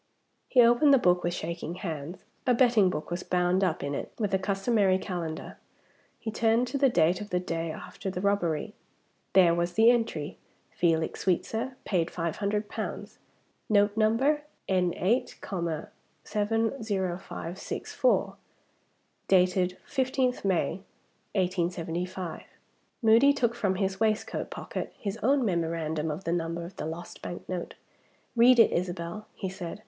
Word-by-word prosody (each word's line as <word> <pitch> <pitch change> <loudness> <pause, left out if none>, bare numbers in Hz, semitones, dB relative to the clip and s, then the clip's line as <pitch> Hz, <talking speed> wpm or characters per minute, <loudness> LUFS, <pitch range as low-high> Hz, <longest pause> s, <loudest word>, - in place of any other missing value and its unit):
He 250 - +5
opened 240 +5 +5
the 275 - +8
book 180 -6 +3
with 175 0 -1
shaking 170 +1 -4
hands. 165 -2 -6 0.2
A 250 - +5
betting 235 -6 +5
book 155 -1 -5
was 175 +1 -2
bound 180 +1 +1
up 180 -4 0
in 140 0 -2
it, - - -4
with 210 -3 -1
the 190 - +2
customary 195 0 +2
calendar. 175 -4 -5 0.6
He 220 - -4
turned 225 +2 +2
to 280 - -2
the 270 -1 +5
date 175 -2 +2
of 205 - -7
the 180 - +1
day 165 -2 -3
after 190 - -6
the 185 - -4
robbery. 180 -6 0 0.6
There 180 -2 +6
was 175 +1 -1
the 225 +4 +6
entry: 225 -11 -2 0.3
"Felix 165 -2 0
Sweetsir. 225 +7 -1
Paid 175 -4 +1
500 200 +5 -2
pounds. - - -6 0.5
Note 205 -1 +4
numbered, 230 +8 +3 0.3
N 180 -2 +2
8, 230 +8 0 0.9
70564; 210 - -1 0.9
dated 180 -1 +3
15th 260 -1 0
May, 190 -1 0 0.5
1875." 180 -1 -2 0.6
Moody 230 +5 +6
took 240 -4 +1
from 200 -5 0
his 190 0 -1
waistcoat 215 -1 0
pocket - - -5
his 200 -2 -4
own 270 +2 +3
memorandum 165 -4 -1
of 155 +5 -4
the 170 - -1
number 170 0 -2
of 175 - -11
the - - -3
lost 165 +2 -7
bank 175 - -7
note. 180 -2 -4 0.6
"Read 245 +2 +7
it 230 - +7
Isabel," 175 +3 -3
he 190 - -4
said. 185 -1 -6
190 Hz, 140 wpm, -28 LUFS, 175-220 Hz, 0.9 s, the